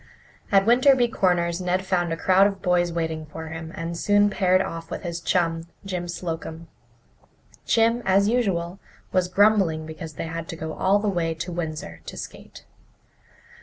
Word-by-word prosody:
At 195 -1 +5
Winterby 245 +1 +5
Corners 175 -1 +1
Ned 180 +1 0
found 175 -3 0
a 165 - -1
crowd 190 +3 +5
of 195 -1 -4
boys 175 -2 +2
waiting 160 -2 -3
for 160 +1 -8
him, 160 0 -7
and 170 -2 -4
soon 205 +3 +3
paired 185 -2 +3
off 165 -3 -4
with - - -6
his 170 -1 -4
chum, 165 -1 0 0.2
Jim 180 -2 -3
Slocum. 165 -1 -5 1.0
Jim, 230 +1 +3
as 195 +1 +3
usual, 195 -6 0 0.3
was 185 -1 +2
grumbling 190 -5 +3
because 160 0 -8
they - - -5
had 165 0 -5
to - - -6
go 160 -1 -5
all 195 +2 +2
the 205 +1 -2
way 170 -4 0
to 160 +3 -5
Windsor 155 - -5
to - - -7
skate. - - -10
175 Hz, 165 wpm, -24 LUFS, 165-195 Hz, 1.0 s, At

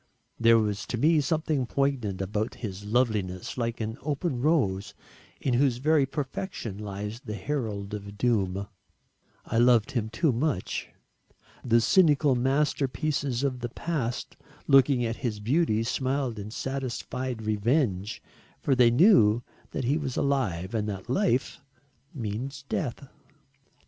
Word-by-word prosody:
There 115 0 +6
was 105 -2 -1
to 120 - -2
me 155 +5 +4
something 150 -3 0
poignant 125 -10 -1
about 105 +3 -2
his 100 -3 -6
loveliness 105 -5 0
like 115 -1 -2
an 110 +1 -4
open 145 -2 -2
rose 115 - +1 0.4
in 130 - 0
whose 125 -1 +3
very 145 +1 +3
perfection 135 - -4
lies 105 +2 -5
the 105 -3 -5
herald 105 -4 -3
of 100 -1 -7
doom. 100 -4 +1 0.8
I 115 - 0
loved 120 +1 +4
him 115 -5 -1
too 150 +6 +1
much. 120 - -2 0.7
The 115 -1 +4
cynical 150 - +4
masterpieces 135 0 0
of 130 -3 -1
the 120 0 -4
past 130 -3 -3 0.3
looking 135 -3 +5
at 115 0 -2
his 115 -5 -3
beauty 115 0 +1
smiled 130 -1 -1
in 100 +1 -6
satisfied 130 -1 -4
revenge 110 - 0 0.4
for 140 - +1
they 125 -2 +6
knew 120 - +5 0.3
that 135 - -3
he 135 +5 +2
was 135 -4 -4
alive 110 -9 0
and 105 -2 -1
that 100 +4 -5
life 135 - +1 0.5
means 130 +4 -4
death. 140 0 -3
120 Hz, 135 wpm, -27 LUFS, 105-140 Hz, 0.8 s, There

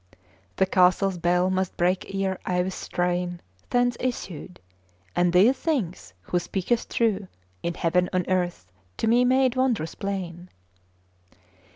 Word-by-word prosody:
The 190 - +3
castle's 185 0 +3
bell 180 +2 +2
must 185 -1 -1
break 180 +1 0
ere 190 -1 -1
I 180 -1 +1
with 190 +1 -3
strain 175 0 -2 0.3
Thence 245 0 +2
issued; 185 - -4 0.6
and 175 0 +3
these 200 +9 +5
things 185 - -2
Who 175 - 0
speaketh 195 +6 -1
true 210 -4 0 0.3
In 170 0 -2
heaven 180 +2 +1
on 185 -2 0
earth, 175 - -1 0.3
to - - -1
me 240 +2 +4
made 260 0 +3
wondrous 245 -11 0
plain. 180 -3 -5
185 Hz, 135 wpm, -25 LUFS, 175-220 Hz, 0.6 s, these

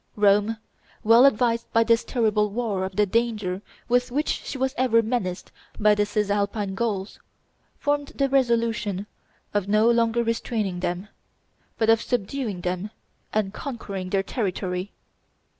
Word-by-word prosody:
Rome, 210 +2 +3 0.5
well 230 +5 +7
advised 235 -1 +1
by 230 - +5
this 230 0 +3
terrible 215 -4 +1
war 205 -3 -2
of 190 0 -7
the 210 +1 +3
danger 210 -3 -1 0.3
with 245 +1 +2
which 290 +5 -1
she - - -5
was 265 0 0
ever 230 -3 +3
menaced 205 -6 -3 0.3
by 210 0 +5
the 205 0 +1
Cisalpine 205 -1 -1
Gauls, 200 -2 -3 0.6
formed 290 -1 0
the 275 - +2
resolution 230 -7 +1 0.5
of 205 -2 0
no 215 +3 +4
longer 235 0 +2
restraining 225 -5 -2
them, 180 +3 -3 0.7
but 225 0 +4
of 225 0 +3
subduing 230 -4 -2
them 180 +3 -3 0.4
and 210 -2 -1
conquering 200 -8 -5
their 195 0 +1
territory. 190 -3 -3
215 Hz, 140 wpm, -25 LUFS, 200-235 Hz, 0.7 s, well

